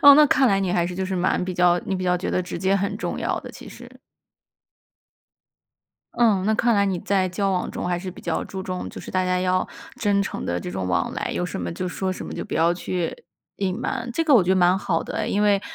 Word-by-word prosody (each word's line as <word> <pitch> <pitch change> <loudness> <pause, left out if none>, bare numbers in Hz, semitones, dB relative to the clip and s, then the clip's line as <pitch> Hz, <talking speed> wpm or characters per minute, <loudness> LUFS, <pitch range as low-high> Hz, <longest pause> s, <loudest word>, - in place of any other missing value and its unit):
哦， 285 0 +11
那 300 +1 +7
看 265 -1 +4
来 195 -3 +3
你 190 -2 0
还 175 -2 +2
是 180 - -5
就 190 - -2
是 190 0 -2
蛮 180 +1 +1
比 185 - -4
较 175 0 +4
你 195 - -1
比 185 - -3
较 180 0 +2
觉 180 - -3
得 185 - +1
直 180 - -6
接 190 +2 +2
很 200 +1 -1
重 - - -3
要 - - -1
的， - - -9
其 - - -11
实。 - - -11 2.3
嗯， 210 -5 +3
那 220 - +3
看 235 +2 +3
来 200 -1 +3
你 190 -2 0
在 190 -2 +1
交 195 +2 -1
往 180 - -1
中， - - -4
还 175 -1 0
是 185 0 -5
比 185 - -11
较 - - -1
注 190 -1 -6
重 185 -1 -4
就 - - -9
是 - - -9
大 185 0 +1
家 180 0 +1
要 185 0 +1 0.3
真 200 -2 +2
诚 - - -5
地 85 0 -1
这 90 - -6
种 95 0 -3
往 90 - 0
来， - - -3
有 180 - -1
什 155 - -5
么 85 -1 -3
就 185 - -3
说 190 +1 -2
什 - - -6
么， - - -7
就 - - -5
不 - - -7
要 165 +2 +3
去 175 -1 -3 0.4
隐 190 -1 -1
瞒， 240 -1 -3
这 330 - +1
个 300 -3 +4
我 230 - +7
觉 180 - -3
得 - - +4
蛮 180 0 +4
好 - - 0
的 - - -5
哎。 215 - -1
因 205 -3 +1
为 205 -1 +3
185 Hz, 290 characters per minute, -23 LUFS, 180-200 Hz, 2.3 s, 哦